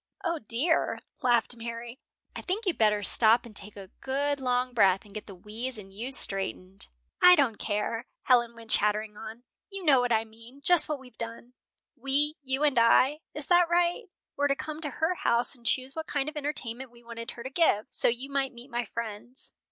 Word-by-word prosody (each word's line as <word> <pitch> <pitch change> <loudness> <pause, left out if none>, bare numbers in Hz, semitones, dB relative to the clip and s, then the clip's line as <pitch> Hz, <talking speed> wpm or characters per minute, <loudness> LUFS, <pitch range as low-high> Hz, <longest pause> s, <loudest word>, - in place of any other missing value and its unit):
"O, 335 -1 -1
dear," 265 +9 0 0.2
laughed 240 -2 +2
Mary, 235 +1 -7 0.4
"I - - -5
think 405 +5 -3
you'd 365 -4 -1
better 210 -2 +3
stop 230 +3 +5
and 225 -3 -13
take 205 +1 -7
a 195 -1 -11
good 285 +2 -1
long 250 -1 -1
breath, 195 -4 +3
and 205 - -15
get 215 - -8
the 195 - -10
we's 220 +6 -6
and 195 -2 -12
you's 245 +6 +1
straightened." 195 -1 +1 0.3
"I 360 - +9
don't 260 -9 +1
care," 225 +3 -3 0.2
Helen 240 -2 +3
went 230 -1 -6
chattering 210 +1 +2
on. 220 +2 -10 0.3
"You 390 -2 -8
know 275 -4 +5
what 245 0 0
I 225 -1 +2
mean, 230 +5 -16
just 345 -2 +4
what 300 -2 -2
we've 255 -1 -17
done. 230 +2 -7 0.4
We, 280 +3 0
you 265 +1 -1
and 285 -5 +3
I, 260 +5 +4 0.2
is 300 -1 -5
that 350 -1 +4
right? 345 +5 +1 0.3
were 285 0 +1
to 275 - +1
come 310 +2 -6
to 300 - -3
her 320 +6 -1
house 235 -8 +1
and 240 -4 -9
choose 260 +3 -1
what 320 -1 -5
kind 285 -1 -2
of 310 - -12
entertainment 265 -4 -1
we 240 0 -20
wanted 230 0 -8
her 235 - -8
to 260 - -7
give, 265 -9 +2
so - - +2
you 250 +4 -2
might 275 -1 -1
meet 245 +3 -12
my 240 0 -2
friends." 230 +3 -8
245 Hz, 205 wpm, -28 LUFS, 225-285 Hz, 0.4 s, I